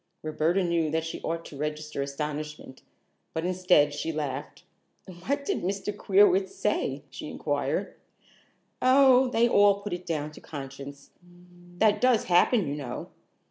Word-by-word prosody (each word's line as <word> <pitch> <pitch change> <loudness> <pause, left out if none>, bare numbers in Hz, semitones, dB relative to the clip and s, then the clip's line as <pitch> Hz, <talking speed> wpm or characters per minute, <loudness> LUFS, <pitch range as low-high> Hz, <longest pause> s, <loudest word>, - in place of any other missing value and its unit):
Roberta 160 +4 +1
knew 170 -2 +1
that 160 +1 -1
she 165 - -6
ought 165 0 -3
to - - -10
register 150 0 -4
astonishment, 150 0 -5 0.5
but 160 +1 -2
instead, 180 -5 +3
she 150 +3 -3
laughed. 145 -3 -5 0.6
"What 280 - -2
did - - -1
Mr. 200 +3 -3
Queerwitz 390 - +3
say?" - - -1
she - - -7
inquired. - - -2 0.9
"Oh, 260 0 +6
they 235 -1 +3
all 205 -3 +4
put 205 - -4
it 180 +1 -6
down 155 -2 -2
to - - -14
conscience. 140 -1 -9 0.7
That 210 +1 +3
does 250 -3 +4
happen, 180 - +3
you 140 - -2
know. 135 -4 -6
165 Hz, 140 wpm, -27 LUFS, 150-210 Hz, 0.9 s, Oh